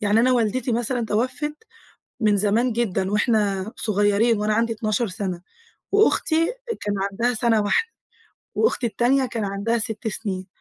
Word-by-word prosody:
يعني 210 +2 +3
أنا 255 +1 +3
والدتي 240 +1 0
مثلًا 240 +1 0
تَوَفّت 255 +8 -1 0.7
من 210 -2 +3
زمان 220 +5 +2
جدًا 195 -4 -1
وإحنا 210 -2 +1
صغيرين 205 +2 +2
وأنا 210 0 +1
عندي 230 +1 +1
12 215 +1 -1
سَنة، 185 -2 -4 0.5
وأختي 330 -5 +3 0.3
كان 205 -1 -2 0.2
عندها 240 +5 0
سَنة 225 -1 +2
واحدة 455 - 0 0.6
وأختي 260 - +1
التانية 255 +4 +2
كان 230 -5 -3
عندها 200 +4 -1
6 220 0 -2
سِنين، 190 -3 -4
220 Hz, 140 wpm, -23 LUFS, 205-240 Hz, 0.7 s, يعني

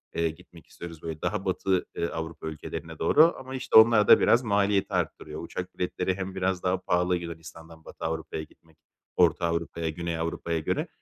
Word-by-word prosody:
eee, 85 0 +1
gitmek 85 +1 -14
istiyoruz. 85 -2 -10
Böyle 80 -2 -6
daha - - -2
Batı, 95 -1 0
eee, 85 - -1
Avrupa 80 -1 -6
ülkelerine 80 -1 -7
doğru 165 +3 +5
ama, 130 0 -7
işte, 130 -3 +3
onlar 110 -1 +7
da - - +8
biraz 120 +2 +4
maliyeti 100 -2 +1
arttırıyor. - - -3
Uçak 90 0 -7
biletleri 90 +1 -1
hem 95 0 -5
biraz 95 -1 -1
daha 95 +1 +1
pahalı 90 0 +1
Yunanistan’dan 80 -1 -10
Batı - - -8
Avrupa’ya 80 -1 -3
gitmek, 80 +1 -21 0.4
Orta - - +3
Avrupa’ya, 85 -1 -2
Güney 85 +1 -4
Avrupa’ya 85 0 -2
göre. 80 - -2
85 Hz, 175 wpm, -27 LUFS, 80-95 Hz, 0.4 s, da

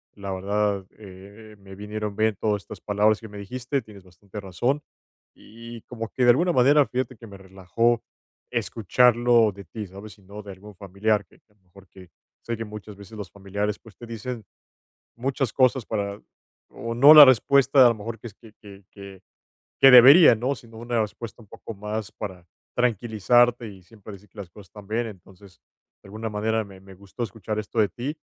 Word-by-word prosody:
La 100 -1 -7
verdad, 100 0 -1
eh 100 +2 -14
eh, - - -16
me 95 -1 -14
vinieron 105 +1 -6
bien 110 0 +1
todas 105 -2 -1
estas - - -11
palabras 105 +2 +1
que 110 - -9
me 105 - -11
dijiste. 125 +7 -4
Tienes 100 -3 -15
bastante 95 +3 -12
razón 120 +10 -2 0.5
y 115 +1 -12
como 115 -2 -7
que 125 - -2
de 120 - +5
alguna 175 +8 +1
manera, 140 +2 +4
fíjate 130 +1 -4
que 115 - -13
me 100 -2 -12
relajó 95 +5 -1 0.5
escucharlo 120 0 +2
de 100 +1 -12
ti, 105 -3 -8
¿sabes?, 100 +2 -12
y - - -23
no 100 +2 -11
de 100 - -10
algún 100 +2 -14
familiar 100 +2 -1
que - - -25
a - - -31
lo 105 - -39
mejor 95 +1 -20
que 90 -2 -16 0.4
Sé 115 -1 -4
que 115 - -5
muchas 105 -1 -11
veces 100 +2 -13
los 100 -4 -8
familiares, 100 +1 -4
pues 110 - -18
te 120 - -11
dicen 115 0 -7 0.7
muchas 130 0 -2
cosas 130 -2 +2
para 100 -1 -4 0.5
o 115 0 -7
no 140 +6 +8
la 150 -2 +12
respuesta 135 +1 +4
a - - +7
lo 115 - -1
mejor 115 +2 -7
que - - -10
es 105 - -17
que 110 -1 -18
que 100 -2 -14
que 100 -2 -12 0.6
que 135 - +8
debería, 135 +4 +9
¿no?, 130 +5 -2
sino 115 -2 -15
una 120 0 -2
respuesta 110 +3 -8
un - - -19
poco 115 - -10
más 105 +1 -5
para 95 -4 -8 0.3
tranquilizarte, 120 0 +1
y 95 -2 -13
siempre 105 +2 -14
decir 100 +2 -16
que - - -21
las 95 -4 -8
cosas 100 +2 -15
están 100 +3 -14
bien. 115 +2 -1
Entonces, 95 -1 -16 0.4
de - - -16
alguna 110 +2 -6
manera 110 +1 -1
me 95 -2 -15
me 95 0 -15
gustó 100 +5 -10
escuchar 110 -1 -6
esto 110 +2 -8
de 105 - +3
ti, 140 +6 -6
105 Hz, 200 wpm, -24 LUFS, 100-120 Hz, 0.7 s, la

